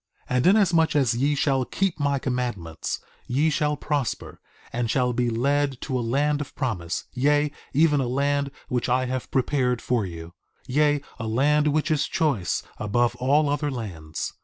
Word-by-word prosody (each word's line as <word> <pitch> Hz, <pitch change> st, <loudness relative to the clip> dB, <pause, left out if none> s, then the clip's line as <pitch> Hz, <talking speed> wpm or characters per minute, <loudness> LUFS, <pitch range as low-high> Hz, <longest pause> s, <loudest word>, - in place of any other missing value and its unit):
2:20 -, -, +1 dB
And 125 Hz, +6 st, +3 dB
inasmuch 175 Hz, -6 st, +4 dB
as 130 Hz, -6 st, +3 dB
ye 140 Hz, +4 st, +1 dB
shall 135 Hz, -2 st, +1 dB
keep 195 Hz, +6 st, -1 dB
my 140 Hz, -1 st, +1 dB
commandments, 120 Hz, -, -3 dB, 0.3 s
ye 150 Hz, +6 st, +2 dB
shall 150 Hz, 0 st, 0 dB
prosper, 145 Hz, -6 st, -3 dB, 0.3 s
and 120 Hz, -1 st, -1 dB
shall 125 Hz, +1 st, +1 dB
be 120 Hz, 0 st, +1 dB
led 140 Hz, +3 st, +1 dB
to 130 Hz, -1 st, -2 dB
a -, -, -1 dB
land 145 Hz, +5 st, +1 dB
of 140 Hz, -, -8 dB
promise; 95 Hz, -11 st, -2 dB
yea, 145 Hz, +3 st, +2 dB, 0.2 s
even 150 Hz, 0 st, +3 dB
a 130 Hz, -, 0 dB
land 140 Hz, +2 st, 0 dB, 0.2 s
which 125 Hz, 0 st, -1 dB
I 130 Hz, +1 st, +2 dB
have 130 Hz, 0 st, -3 dB
prepared 130 Hz, -2 st, +1 dB
for 120 Hz, -2 st, 0 dB
you; 85 Hz, -2 st, -7 dB, 0.3 s
yea, 145 Hz, +2 st, +2 dB, 0.2 s
a 110 Hz, -, -3 dB
land 145 Hz, +6 st, +3 dB
which 155 Hz, +2 st, +1 dB
is 150 Hz, -2 st, +1 dB
choice 140 Hz, -, 0 dB, 0.2 s
above 120 Hz, +3 st, +1 dB
all 145 Hz, +4 st, +3 dB
other 145 Hz, +1 st, 0 dB
lands. 90 Hz, -, -5 dB
135 Hz, 170 wpm, -25 LUFS, 120-145 Hz, 0.3 s, inasmuch